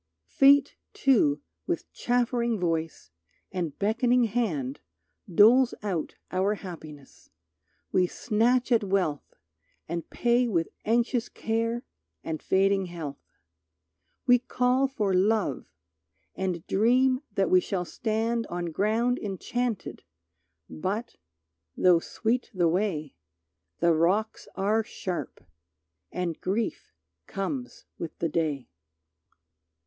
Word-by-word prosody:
Fate, 275 - +4 0.2
too, 155 - +3 0.2
with - - -3
chaffering 240 -2 0
voice 165 - -2 0.4
and 170 -6 -3
beckoning 240 +4 +2
hand 185 - -1 0.5
Doles 235 +8 +6
out 185 -6 -2 0.2
our 190 +3 +1
happiness; 155 -8 -11 0.6
we 180 -1 +3
snatch 240 +5 +1
at 230 -3 +4
wealth 185 -7 -1 0.5
And 170 0 -4
pay 240 +1 +2
with 170 -7 0 0.2
anxious 235 +1 +1
care 230 +2 -2 0.4
and 160 -1 -4
fading 195 0 +2
health. 160 -5 -7 1.0
We 245 -1 +6
call 250 +2 +1
for 215 -8 -1
Love, 195 - +1 0.7
and 185 -3 -3
dream 255 +5 +3
that 195 -1 +1
we 185 - +7
shall 180 -1 -2
stand 225 +3 -1
On 175 -1 -4
ground 225 +8 +1
enchanted, 215 +2 -3 0.7
but, 200 +8 -4 0.6
though 180 -2 +5
sweet 230 +8 -2
the 175 -2 +3
way, 165 -5 -1 0.7
The 170 -1 +5
rocks 190 +7 +1
are 210 +3 +1
sharp, 185 -5 -5 0.7
and 175 -3 -3
grief 210 +5 -2 0.4
comes 250 +6 -4
with 165 - -6
the 165 - -1
Day. 150 -5 -1
200 Hz, 105 wpm, -27 LUFS, 170-235 Hz, 1.0 s, we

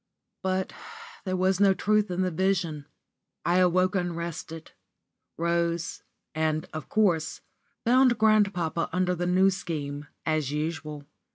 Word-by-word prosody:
*_ - - -55 0.4
But 190 0 -1 0.5
there 185 -1 -1
was 185 +1 +2
no 195 -1 +5
truth 210 +1 +2
in 180 +1 0
the 185 - 0
vision. 170 -4 0 0.6
I 175 +1 +3
awoke 185 +1 +3
unrested 170 -3 -4 0.7
rose, 170 0 -1 0.3
and, 155 0 0
of 155 -1 -6
course, 175 -7 +1 0.4
found 250 +1 +5
grandpapa 200 -7 +2
under 180 +1 +1
the 175 0 -2
New 190 +2 +4
Scheme, 145 -6 -4 0.2
as 155 -4 0
usual. 150 -1 -4
175 Hz, 125 wpm, -27 LUFS, 160-190 Hz, 0.7 s, no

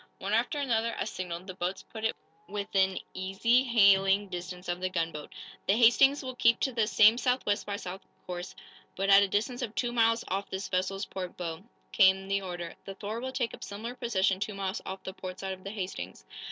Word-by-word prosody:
One - - -3
after 295 - +1
another, 230 -5 0
as 215 - -3
signaled, 180 -1 -5
the 185 - -7
boats 180 +1 -3
put 220 -1 -9
in 225 - +2 0.4
within 195 -2 0
easy 195 +7 +2
hailing 200 -3 +5
distance 180 0 -6
of 175 0 -2
the 185 - 0
gunboat. 165 -4 -3 0.4
"The 195 - +4
'Hastings' 270 +5 +5
will 260 -1 -4
keep 230 -1 +4
to 265 - +1
the 230 -3 +1
same 220 +3 +6
South 250 +1 +1
West, 205 0 0
by 200 - -2
South 190 -1 -6 0.2
course, 180 0 -6 0.4
but 195 +1 +1
at 195 0 +9
a 200 - +3
distance 230 +6 -1
of 230 -3 -4
two 240 -1 0
miles 230 -1 +2
off 195 +2 -2
this 190 0 -4
vessel's 190 +2 -1
port 185 -2 -6
bow," 170 0 -5 0.3
came 190 -1 +5
the 195 0 +1
order. 175 -3 -5
"The 195 - -7
'Thor' 210 +3 -4
will 260 +1 -3
take 245 -3 -2
up - - -9
similar 220 +4 -6
position, 195 -7 +1
two 210 0 -3
miles 195 -1 -3
off 190 0 -6
the 190 - -6
port 185 -1 -7
side 190 -1 -3
of 185 0 -11
the 195 - -5
'Hastings.'" 195 -3 -6
195 Hz, 215 wpm, -29 LUFS, 185-230 Hz, 0.4 s, at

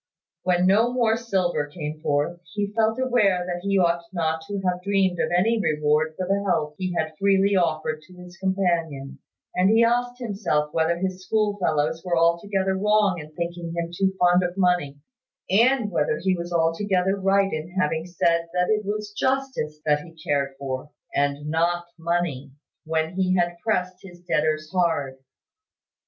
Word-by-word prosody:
When 180 0 +2
no 215 +6 +4
more 235 -3 +2
silver 190 -9 -1
came 150 0 -6
forth, 150 +4 -1
he 205 0 -2
felt 220 0 +2
aware 210 -9 +2
that 175 -1 -3
he 195 +1 +1
ought 170 -2 +2
not 160 -3 -1
to 205 -1 -3
have 180 -1 -1
dreamed 190 -2 +1
of - - +1
any 215 +6 +2
reward 150 -1 +1
for 185 -1 -3
the 200 +1 +1
help 150 -6 0
he 185 -1 -2
had 155 0 -2
freely 195 0 +3
offered 155 -3 0
to 185 - -16
his 180 0 -12
companion: 165 -8 -1 0.3
and 185 +1 +3
he 225 +2 +5
asked 245 +1 +1
himself 195 -11 -1
whether 165 +1 +1
his 185 +1 -3
schoolfellows 180 -8 0
were 175 -2 0
altogether 190 +4 +1
wrong 205 -2 +2
in 150 0 -10
thinking 170 0 -4
him 170 0 -2
too 190 +2 0
fond 180 0 +5
of 180 +1 -3
money; 180 -7 +1 0.5
and 230 +1 +3
whether 150 -2 +1
he 185 +2 +1
was 175 0 -6
altogether 180 +3 +1
right 195 0 +2
in 155 +2 -4
having 160 0 0
said 170 -1 +1
that 180 +3 +2
it 215 0 +1
was 210 +1 -4
justice 260 - -1
that 150 -1 +3
he 165 +1 -14
cared 140 -1 0
for, 135 0 -5 0.2
and 145 +1 0
not 170 +2 0
money, 165 -5 -2 0.3
when 160 +1 -1
he 185 0 +1
had 175 -1 +1
pressed 185 -5 0
his 175 -3 -13
debtor 155 -3 +1
hard. 160 -8 0
180 Hz, 170 wpm, -24 LUFS, 160-195 Hz, 0.5 s, he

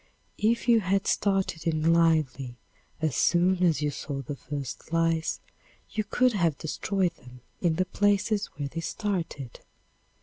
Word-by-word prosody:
If 230 +3 +1
you 235 -1 +6
had 195 0 0
started 190 -5 0
in 160 0 +3
lively 155 -7 +2 0.5
as 155 -7 +1
soon 180 +5 +3
as 160 -4 +3
you 150 - +1
saw 140 -1 -5
the 140 +3 -5
first 140 +1 -6
lice 165 -1 +1 0.5
you 215 - -1
could 250 +4 +2
have 170 -7 +1
destroyed 180 +3 -1
them 125 0 -15 0.2
in 170 -3 +2
the 185 +3 +1
places 205 +2 +1
where 145 -1 -2
they 165 +4 -5
started. 165 - -3
165 Hz, 145 wpm, -27 LUFS, 150-195 Hz, 0.5 s, you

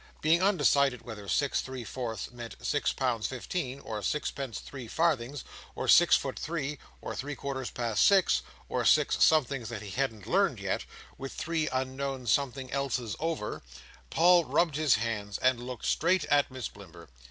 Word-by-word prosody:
Being 165 +3 +3
undecided 140 - +3
whether 105 -4 -8
six 140 +7 +1
three 130 -2 -6
fourths 115 -2 -5
meant 120 -1 -8
six 145 -1 +1
pounds 120 -5 -1
fifteen, 135 +1 -4
or 110 -5 -5
sixpence 135 +1 -2
three 135 -4 -9
farthings, 145 -2 0 0.3
or - - -3
six - - +7
foot - - -5
three, 150 -3 -3 0.2
or - - -4
three 145 +2 -4
quarters 130 -1 -4
past 115 -4 0
six, 195 -2 +5 0.3
or - - -1
six - - +4
somethings 135 -6 +3
that 110 -3 -6
he 100 - -7
hadn't 115 -4 -2
learnt - - +2
yet, - - -2 0.3
with 135 0 -6
three 160 -1 -1
unknown 130 0 -3
something 135 +1 0
elses 125 -5 -2
over, 160 -9 -3 0.5
Paul 175 +1 +5
rubbed 165 -2 +1
his 150 -4 +4
hands 105 -3 -2
and 130 -2 +2
looked 125 -2 -6
straight 180 +3 +2
at 145 -1 +4
Miss 130 -3 -5
Blimber. 85 -4 -13
130 Hz, 165 wpm, -29 LUFS, 115-145 Hz, 0.5 s, six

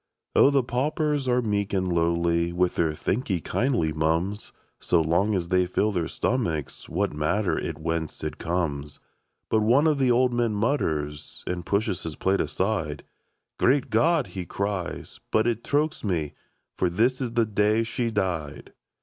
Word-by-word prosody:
Oh, - - +7
the 140 -2 +2
paupers 145 +3 -1
are 125 0 +2
meek 100 -2 -1
and 95 -2 0
lowly 85 0 +1
With 90 +1 +1
their 80 -2 +1
" - - -9
Thank 120 - -2
'ee 95 -3 +1
kindly, 85 - 0
mum's"; 80 +6 -1 0.3
So 85 - +2
long 85 +6 +2
as 85 -2 -2
they 90 -1 +3
fill 105 +4 +1
their 85 -5 -1
stomachs, 80 - -2
What - - -1
matter 80 +4 0
it - - -3
whence 80 -1 -3
it 75 0 -4
comes? 75 -4 -2 0.5
But 110 - +2
one 125 +8 +4
of 155 -3 +3
the 130 -2 +3
old 125 +1 +3
men 120 -3 +1
mutters, 80 - -2
And 90 -1 -4
pushes 100 -2 0
his 80 -2 -5
plate 95 +1 +1
aside: 90 -7 -2 0.3
" - - -54
Great 130 0 +2
God 155 +6 +3
!'* - - -16
he 95 - -4
cries; 100 0 -4
" - - -50
but 110 0 +3
it 120 -1 0
chokes 150 +2 0
me! 80 -7 -1 0.5
For 90 - +2
this 120 +9 +1
is 120 -3 -2
the 115 -1 +3
day 105 +1 +2
she 115 +1 -2
died." 85 -9 -3
100 Hz, 180 wpm, -26 LUFS, 85-120 Hz, 0.5 s, Oh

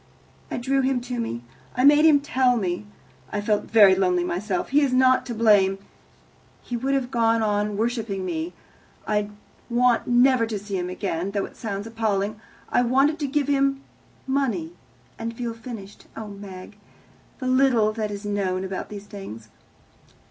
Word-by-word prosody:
I - - -3
drew 270 +2 +1
him 260 -1 +1
to 245 0 -5
me. 120 - -3 0.3
I 250 - +1
made 295 +2 +7
him 295 -3 +6
tell 255 -3 +2
me. 185 -1 -2 0.4
I 205 - -1
felt 210 0 0
very 205 -4 +7
lonely 180 -2 +2
myself. 185 +2 -2
He 290 +3 +4
is 280 -3 +2
not 255 0 +4
to 240 - -4
blame. 205 -4 +4 0.9
He 245 - -4
would 265 +4 0
have 260 -2 -2
gone 230 -1 +2
on 210 -1 0
worshipping 220 -4 -2
me. 170 0 -3 0.5
I 210 -1 0 0.4
want 240 0 +2
never 245 -1 +4
to 220 -2 -3
see 200 0 -5
him 180 -1 -2
again, 185 -1 -3
though 200 -1 -1
it - - -13
sounds 200 -2 -4
appalling. 215 -2 -1 0.3
I - - +3
wanted 270 +6 +2
to 290 - -1
give 285 0 0
him 275 -1 +1 0.4
money 245 -12 -1 0.5
and 230 0 -5
feel 235 -2 -3
finished. 225 -4 -10
Oh, 220 -2 -6
Meg, 200 0 -10 0.6
the 260 - -6
little 255 -4 +3
that 215 -1 -2
is 205 0 -6
known 190 -2 -1
about 190 0 -5
these 205 -1 -8
things!" 115 - -9
220 Hz, 170 wpm, -24 LUFS, 200-255 Hz, 0.9 s, made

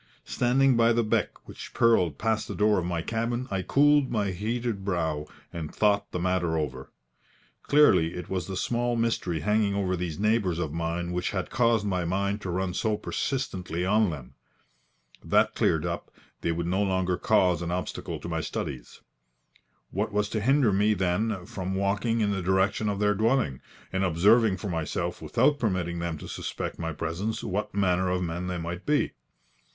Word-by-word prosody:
Standing 130 +1 +3
by 115 0 +4
the 115 0 +2
beck 110 - -1
which - - -10
purled 90 -10 +3
past 110 0 0
the - - -5
door 105 -1 +3
of 85 - -3
my 85 -2 -2
cabin, 120 +4 -2
I 95 -1 0
cooled 145 +5 +4
my 105 -4 0
heated 110 +2 -2
brow, 80 -6 -1 0.3
and 80 -3 -5
thought 100 -1 +1
the - - -3
matter 90 -2 0
over. 65 -4 -4 0.7
Clearly 95 - +4
it 90 - -6
was 90 -3 -3
the 95 -1 -4
small 120 +3 0
mystery 115 -8 -1
hanging 105 +2 +1
over 95 -2 0
these 85 -3 -4
neighbours 105 -5 +1
of 80 -4 -3
mine 85 +1 -2
which 90 0 -1
had 95 -3 -3
caused 115 -4 +2
my 90 -3 0
mind 100 +4 -1
to 95 - -5
run 90 +1 -1
so 110 +2 0
persistently 95 - -3
on 105 +1 +3
them. 70 -6 -7 0.9
That - - +3
cleared - - +1
up, - - -4 0.3
they 85 - 0
would 85 +1 -2
no 95 +3 0
longer 95 -2 +1
cause 95 -3 +2
an 85 - -3
obstacle 90 +1 -4
to - - -6
my - - -2
studies. 65 -4 -5 0.9
What 105 +3 -1
was 105 0 0
to 110 - -2
hinder 130 -2 +3
me, 105 +2 +3
then, 95 +1 -1
from 95 +1 -4
walking 105 +4 0
in 105 -1 +2
the 100 -2 -1
direction 95 +3 +1
of 100 - -1
their 105 0 +2
dwelling, 110 - +1 0.3
and 95 0 +1
observing 100 +4 +4
for 100 - -5
myself, 80 -4 -3
without 145 -1 +2
permitting 90 -6 -1
them 85 -2 -3
to - - -9
suspect - - -5
my 80 -1 -2
presence, 85 +8 -3
what 100 +1 -3
manner 95 -2 +2
of 90 0 0
men 85 +1 -3
they 90 -1 -2
might 85 +2 -5
be? 150 0 +2
95 Hz, 180 wpm, -27 LUFS, 85-110 Hz, 0.9 s, by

